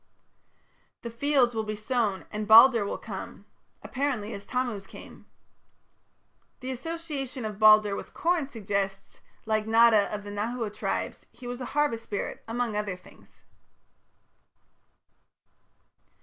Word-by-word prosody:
The 235 Hz, -, -5 dB
fields 255 Hz, 0 st, +2 dB
will 220 Hz, -1 st, -1 dB
be 215 Hz, 0 st, -4 dB
sown 215 Hz, -3 st, -1 dB
and 210 Hz, 0 st, -4 dB
"Balder 230 Hz, +1 st, +8 dB
will -, -, -3 dB
come" -, -, -8 dB, 0.4 s
apparently 250 Hz, -6 st, -2 dB
as 200 Hz, -1 st, -8 dB
Tammuz 240 Hz, -6 st, -2 dB
came. -, -, -13 dB, 1.3 s
The 260 Hz, 0 st, -5 dB
association 275 Hz, -3 st, -5 dB
of 210 Hz, -1 st, -6 dB
Balder 215 Hz, -1 st, +6 dB
with -, -, -8 dB
corn 335 Hz, -5 st, 0 dB
suggests 195 Hz, -4 st, -3 dB
that, -, -, -36 dB, 0.2 s
like 215 Hz, -1 st, 0 dB
Nata 225 Hz, -2 st, +5 dB
of 210 Hz, -1 st, -4 dB
the 205 Hz, -, -8 dB
Nahua 220 Hz, +1 st, -3 dB
tribes, -, -, -3 dB
he 250 Hz, -, -14 dB
was 245 Hz, +1 st, -5 dB
a -, -, -3 dB
harvest 285 Hz, -6 st, +1 dB
spirit, 200 Hz, -, -5 dB
among 230 Hz, -1 st, -2 dB
other 210 Hz, -3 st, -2 dB
things. 180 Hz, -, -20 dB
225 Hz, 130 wpm, -27 LUFS, 210-255 Hz, 1.3 s, Balder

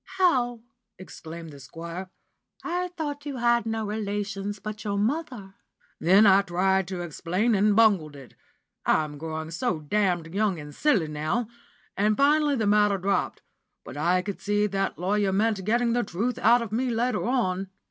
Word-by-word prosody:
'How?' 250 Hz, -11 st, +2 dB, 0.4 s
exclaimed 165 Hz, -3 st, -10 dB
the 140 Hz, -, -12 dB
Squire, 170 Hz, +6 st, -8 dB, 0.5 s
'I 360 Hz, +1 st, -2 dB
thought 290 Hz, -2 st, -4 dB
you 280 Hz, -2 st, -4 dB
had 235 Hz, -1 st, +2 dB
no 220 Hz, -1 st, -2 dB
relations 205 Hz, -1 st, -3 dB
but 210 Hz, +1 st, -7 dB
your 200 Hz, -1 st, -2 dB
mother?' 235 Hz, -3 st, -2 dB, 0.5 s
Then 190 Hz, +6 st, +5 dB
I 195 Hz, 0 st, +6 dB
tried 190 Hz, 0 st, +1 dB
to 185 Hz, -1 st, -4 dB
explain, 180 Hz, +7 st, -1 dB
and 205 Hz, 0 st, +3 dB
bungled 195 Hz, -10 st, +3 dB
it 135 Hz, -2 st, -13 dB, 0.5 s
I'm 150 Hz, -2 st, 0 dB
growing 160 Hz, 0 st, -5 dB
so 180 Hz, +1 st, -1 dB
damned 175 Hz, 0 st, -1 dB
young 200 Hz, -4 st, 0 dB
and 150 Hz, 0 st, -9 dB
silly 215 Hz, -, +2 dB
now 155 Hz, +10 st, -2 dB, 0.5 s
and 210 Hz, +2 st, +1 dB
finally 295 Hz, +1 st, +3 dB
the 225 Hz, -4 st, 0 dB
matter 205 Hz, -1 st, +3 dB
dropped, 195 Hz, +2 st, -1 dB, 0.4 s
but -, -, -10 dB
I 175 Hz, +5 st, +1 dB
could 200 Hz, -1 st, -6 dB
see 205 Hz, 0 st, +1 dB
that 195 Hz, -1 st, -2 dB
lawyer 195 Hz, +2 st, 0 dB
meant 205 Hz, 0 st, +1 dB
getting 235 Hz, +2 st, +2 dB
the 245 Hz, -, +2 dB
truth 215 Hz, +7 st, -2 dB
out 235 Hz, +2 st, +4 dB
of 220 Hz, -, -8 dB
me 250 Hz, +4 st, 0 dB
later 240 Hz, +2 st, 0 dB
on. 195 Hz, -7 st, 0 dB
205 Hz, 165 wpm, -26 LUFS, 180-235 Hz, 0.5 s, I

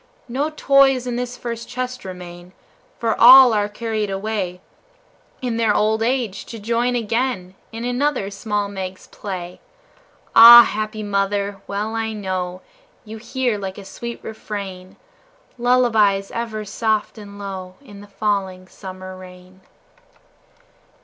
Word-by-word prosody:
No 270 Hz, +5 st, -1 dB
toys 275 Hz, -4 st, +3 dB
in 245 Hz, -1 st, -3 dB
this 245 Hz, 0 st, -4 dB
first 235 Hz, -1 st, -6 dB
chest 255 Hz, 0 st, -5 dB
remain, 180 Hz, -1 st, -10 dB, 0.4 s
For 230 Hz, -, 0 dB
all 255 Hz, 0 st, +9 dB
are 205 Hz, -1 st, 0 dB
carried 215 Hz, -1 st, -3 dB
away, 195 Hz, -2 st, -3 dB, 0.8 s
In 240 Hz, -2 st, -2 dB
their 225 Hz, -3 st, +2 dB
old 220 Hz, +1 st, +1 dB
age, 235 Hz, -4 st, -1 dB
to 230 Hz, -, -9 dB
join 235 Hz, +3 st, 0 dB
again 230 Hz, -4 st, -2 dB, 0.2 s
In 230 Hz, +1 st, -6 dB
another 245 Hz, -4 st, -1 dB
small 205 Hz, 0 st, -2 dB
Meg's 190 Hz, -2 st, -7 dB
play. 180 Hz, -3 st, -7 dB, 0.7 s
Ah, 235 Hz, +1 st, +11 dB
happy 215 Hz, 0 st, -4 dB
mother! 200 Hz, 0 st, -1 dB
Well 210 Hz, +2 st, -3 dB
I 225 Hz, -1 st, -2 dB
know 185 Hz, -3 st, -4 dB, 0.4 s
You 220 Hz, +1 st, -8 dB
hear, 240 Hz, -1 st, -2 dB
like 190 Hz, -1 st, -6 dB
a 200 Hz, -, -10 dB
sweet 235 Hz, +4 st, -7 dB
refrain, 195 Hz, -4 st, -7 dB, 0.6 s
Lullabies 220 Hz, -5 st, +2 dB
ever 220 Hz, -2 st, -4 dB
soft 215 Hz, +1 st, -1 dB
and 200 Hz, -1 st, -11 dB
low 190 Hz, -2 st, -7 dB
In 205 Hz, -8 st, -14 dB
the 205 Hz, -, -13 dB
falling 195 Hz, -2 st, -2 dB
summer 185 Hz, -1 st, -9 dB
rain. 185 Hz, 0 st, -14 dB
210 Hz, 130 wpm, -20 LUFS, 195-235 Hz, 0.8 s, Ah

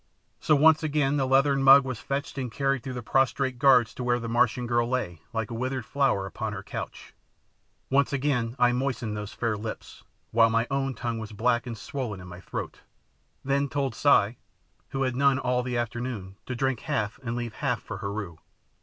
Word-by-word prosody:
So 155 Hz, -, +3 dB
once 155 Hz, +2 st, +5 dB
again 145 Hz, -2 st, +1 dB
the 135 Hz, -2 st, +1 dB
leathern 135 Hz, +1 st, +3 dB
mug 135 Hz, 0 st, +8 dB
was 130 Hz, -4 st, -4 dB
fetched 140 Hz, 0 st, -3 dB
and 125 Hz, -3 st, -3 dB
carried 135 Hz, +1 st, 0 dB
through 130 Hz, +1 st, -6 dB
the 125 Hz, -, -5 dB
prostrate 130 Hz, +1 st, +1 dB
guards 125 Hz, -4 st, +5 dB
to 125 Hz, -, -6 dB
where 120 Hz, 0 st, +1 dB
the 115 Hz, -, -5 dB
Martian 120 Hz, +1 st, +2 dB
girl 120 Hz, 0 st, +1 dB
lay, 90 Hz, -11 st, -2 dB
like 115 Hz, -2 st, -3 dB
a -, -, -3 dB
withered 130 Hz, +1 st, -3 dB
flower, 135 Hz, -9 st, +1 dB
upon 95 Hz, -, -4 dB
her -, -, -6 dB
couch. -, -, -7 dB, 0.8 s
Once 140 Hz, +1 st, +3 dB
again 130 Hz, -4 st, 0 dB
I 125 Hz, -1 st, +4 dB
moistened 125 Hz, -4 st, -2 dB
those 105 Hz, -1 st, -5 dB
fair 115 Hz, -2 st, -1 dB
lips, 110 Hz, +1 st, -7 dB, 0.3 s
while 115 Hz, 0 st, +5 dB
my 115 Hz, +1 st, +2 dB
own 135 Hz, -1 st, -1 dB
tongue 115 Hz, 0 st, -3 dB
was 110 Hz, -1 st, -7 dB
black 120 Hz, +3 st, +1 dB
and 115 Hz, -2 st, -5 dB
swollen 120 Hz, -5 st, -5 dB
in 90 Hz, -, -10 dB
my 90 Hz, 0 st, -9 dB
throat, -, -, -6 dB, 0.7 s
then 140 Hz, +1 st, +1 dB
told 135 Hz, -3 st, -1 dB
Si, 120 Hz, -4 st, +3 dB, 0.5 s
who 135 Hz, 0 st, -1 dB
had 130 Hz, -, +2 dB
had -, -, -6 dB
none 140 Hz, -1 st, +4 dB
all 125 Hz, -2 st, 0 dB
the 125 Hz, -1 st, -2 dB
afternoon, 120 Hz, -5 st, -4 dB
to 130 Hz, -, -3 dB
drink 130 Hz, -1 st, 0 dB
half 105 Hz, +2 st, -2 dB
and 120 Hz, -3 st, -3 dB
leave 120 Hz, -2 st, -4 dB
half 125 Hz, -3 st, -1 dB
for 110 Hz, -, -6 dB
Heru. 100 Hz, -4 st, -5 dB
125 Hz, 200 wpm, -27 LUFS, 115-135 Hz, 0.8 s, mug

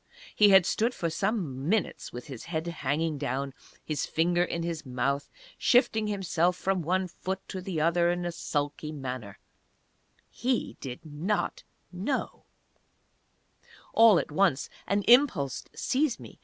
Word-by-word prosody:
He 210 Hz, -1 st, +6 dB
had 190 Hz, -3 st, +7 dB
stood 235 Hz, +3 st, +1 dB
for 170 Hz, -1 st, -2 dB
some 165 Hz, -, -2 dB
minutes 220 Hz, +1 st, 0 dB
with 125 Hz, -, -8 dB
his 135 Hz, -6 st, -8 dB
head 160 Hz, -1 st, -3 dB
hanging 155 Hz, -1 st, -1 dB
down, 135 Hz, 0 st, -2 dB, 0.3 s
his 155 Hz, -2 st, -2 dB
finger 175 Hz, +2 st, +2 dB
in 170 Hz, -1 st, -3 dB
his 165 Hz, -2 st, -3 dB
mouth, 135 Hz, +2 st, -1 dB, 0.3 s
shifting 220 Hz, -3 st, +3 dB
himself 180 Hz, -3 st, +1 dB
from 190 Hz, 0 st, 0 dB
one 185 Hz, +3 st, 0 dB
foot 190 Hz, +2 st, -5 dB
to 190 Hz, -, -5 dB
the 180 Hz, -3 st, -3 dB
other 170 Hz, +2 st, +3 dB
in 175 Hz, 0 st, -1 dB
a 175 Hz, -, -1 dB
sulky 150 Hz, -2 st, -3 dB
manner 130 Hz, -8 st, -6 dB, 0.9 s
He 255 Hz, 0 st, -1 dB
did 130 Hz, +2 st, -7 dB
not 160 Hz, +8 st, -2 dB, 0.3 s
know! 200 Hz, +10 st, -3 dB, 1.5 s
All 225 Hz, -4 st, +7 dB
at -, -, -2 dB
once 155 Hz, -4 st, +2 dB, 0.2 s
an 200 Hz, 0 st, +1 dB
impulse 220 Hz, -, +4 dB
seized 270 Hz, -1 st, 0 dB
me. -, -, -12 dB
170 Hz, 140 wpm, -28 LUFS, 145-195 Hz, 1.5 s, had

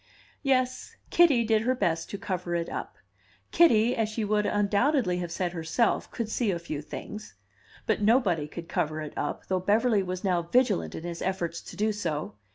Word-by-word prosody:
Yes, 255 Hz, -2 st, 0 dB, 0.2 s
Kitty 300 Hz, -9 st, +5 dB
did 220 Hz, -1 st, +2 dB
her 255 Hz, +3 st, +1 dB
best 170 Hz, -7 st, -1 dB
to 200 Hz, -, -4 dB
cover 180 Hz, -3 st, -3 dB
it 170 Hz, -1 st, -2 dB
up; -, -, -5 dB, 0.6 s
Kitty, 240 Hz, -8 st, +5 dB
as 220 Hz, -2 st, 0 dB
she 220 Hz, 0 st, -2 dB
would 210 Hz, 0 st, +1 dB
undoubtedly 205 Hz, -, +2 dB
have 175 Hz, -1 st, -4 dB
said 175 Hz, +1 st, -1 dB
herself, 170 Hz, +8 st, 0 dB
could 230 Hz, -3 st, -4 dB
see 220 Hz, 0 st, 0 dB
a 180 Hz, -, 0 dB
few 155 Hz, -3 st, -5 dB
things. 210 Hz, +7 st, -8 dB, 0.5 s
But -, -, 0 dB
nobody 205 Hz, -, +3 dB
could 170 Hz, +2 st, -8 dB
cover 155 Hz, +1 st, -1 dB
it 150 Hz, -, -6 dB
up, 145 Hz, -, -3 dB
though 185 Hz, -1 st, 0 dB
Beverly 210 Hz, +3 st, +2 dB
was 185 Hz, -1 st, -4 dB
now 180 Hz, -3 st, +2 dB
vigilant 170 Hz, -, +1 dB
in -, -, -6 dB
his 170 Hz, -1 st, -5 dB
efforts 175 Hz, -3 st, -2 dB
to -, -, -11 dB
do 215 Hz, +1 st, +1 dB
so. 165 Hz, -8 st, -3 dB
200 Hz, 185 wpm, -28 LUFS, 170-225 Hz, 0.6 s, Kitty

